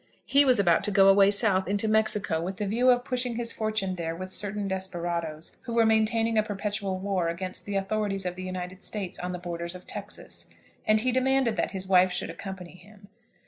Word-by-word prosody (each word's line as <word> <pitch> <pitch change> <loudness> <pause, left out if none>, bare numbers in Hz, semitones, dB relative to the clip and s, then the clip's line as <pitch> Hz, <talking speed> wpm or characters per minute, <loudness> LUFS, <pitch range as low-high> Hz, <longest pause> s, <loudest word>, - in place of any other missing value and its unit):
He 285 +1 +5
was 255 -4 +4
about 175 -3 +3
to - - -1
go 195 -1 +6
away 195 0 +6
South, 200 -2 +2
into 205 +3 0
Mexico, 210 -6 +1
with 185 +3 -4
the 210 - -2
view 235 +6 +2
of 245 -1 +4
pushing 250 -2 -1
his 235 0 -2
fortune 215 -4 -2
there 165 -1 -3
with 185 +2 -7
certain 205 +1 -2
desperadoes, 175 -4 -4
who 235 - -4
were 230 -1 +5
maintaining 220 0 +2
a - - +5
perpetual 205 -2 -3
war 190 -2 -1
against 185 +2 -5
the 205 - -4
authorities 195 0 -1
of 180 0 -3
the 185 - -7
United 185 0 -6
States 195 -3 -5
on 180 0 -3
the 180 - -4
borders 170 0 -5
of 180 - -11
Texas, - - -8 0.4
and 215 0 +4
he 255 +2 +1
demanded 260 -2 +2
that - - 0
his 190 -1 -4
wife 185 -1 +5
should 180 - -3
accompany 185 0 -8
him. 200 +1 -17
195 Hz, 210 wpm, -27 LUFS, 185-220 Hz, 0.4 s, go